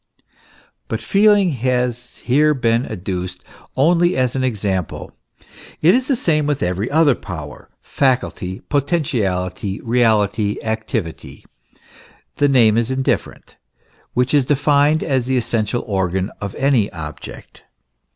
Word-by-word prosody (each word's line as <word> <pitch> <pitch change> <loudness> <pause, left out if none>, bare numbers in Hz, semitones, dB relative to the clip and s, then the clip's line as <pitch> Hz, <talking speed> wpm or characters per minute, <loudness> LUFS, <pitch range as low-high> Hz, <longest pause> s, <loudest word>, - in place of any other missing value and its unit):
But - - -3
feeling 205 -2 +3
has 125 -1 -2
here 150 +4 +3
been 115 -1 +1
adduced 90 -3 -5 0.3
only 175 +5 +3
as 130 -1 0
an 130 - 0
example. 100 -8 -3 0.6
It 170 +4 +5
is 255 +2 +1
the 275 - +2
same 155 - +1
with 145 -2 -1
every 90 +5 -1
other 155 -1 +4
power, 80 - -9
faculty, 125 -8 -1
potentiality, 110 - -1
reality, 110 -3 +1
activity 110 -6 -4 0.9
the 145 - +3
name 115 -5 +4
is 115 0 -1
indifferent 130 0 -2 0.6
which 125 +2 +1
is 145 -3 +4
denned 145 +1 +3
as 130 -4 0
the 130 0 +1
essential 115 0 -1
organ 95 -1 -1
of 100 -1 -5
any 135 -7 +1
object. 75 -5 -9
125 Hz, 120 wpm, -19 LUFS, 100-145 Hz, 0.9 s, It